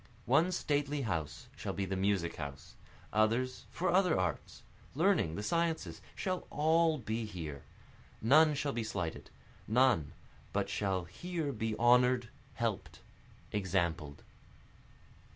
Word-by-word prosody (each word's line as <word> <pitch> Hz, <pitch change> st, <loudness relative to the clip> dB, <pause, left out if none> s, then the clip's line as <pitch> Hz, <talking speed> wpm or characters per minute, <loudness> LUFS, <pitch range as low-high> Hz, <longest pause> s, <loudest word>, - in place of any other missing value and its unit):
One 175 Hz, +3 st, +4 dB
stately 145 Hz, -4 st, 0 dB
house 80 Hz, -9 st, -3 dB
shall -, -, -4 dB
be 100 Hz, -, -2 dB
the 95 Hz, +1 st, -2 dB
music 95 Hz, -3 st, 0 dB
house, 70 Hz, -2 st, -7 dB, 0.4 s
Others 115 Hz, +4 st, +1 dB
for 180 Hz, +1 st, -1 dB
other 180 Hz, -, +4 dB
arts 90 Hz, -5 st, -3 dB, 0.3 s
learning, 165 Hz, -, +2 dB
the 105 Hz, -, -4 dB
sciences, 165 Hz, +4 st, -1 dB
shall 185 Hz, -1 st, -3 dB
all 160 Hz, +1 st, +3 dB
be 115 Hz, -2 st, -3 dB
here, 80 Hz, -9 st, -6 dB, 0.6 s
None 150 Hz, +6 st, +5 dB
shall 145 Hz, 0 st, -1 dB
be 120 Hz, -, -2 dB
slighted, 95 Hz, -7 st, -4 dB, 0.4 s
none 110 Hz, -, +3 dB, 0.4 s
but 100 Hz, -1 st, 0 dB
shall 100 Hz, -2 st, 0 dB
here 165 Hz, -, -4 dB
be 110 Hz, -3 st, -2 dB
honor'd, 125 Hz, 0 st, +4 dB, 0.3 s
help'd, -, -, -2 dB, 0.5 s
exampled. 85 Hz, -7 st, -1 dB
115 Hz, 120 wpm, -33 LUFS, 95-150 Hz, 0.6 s, None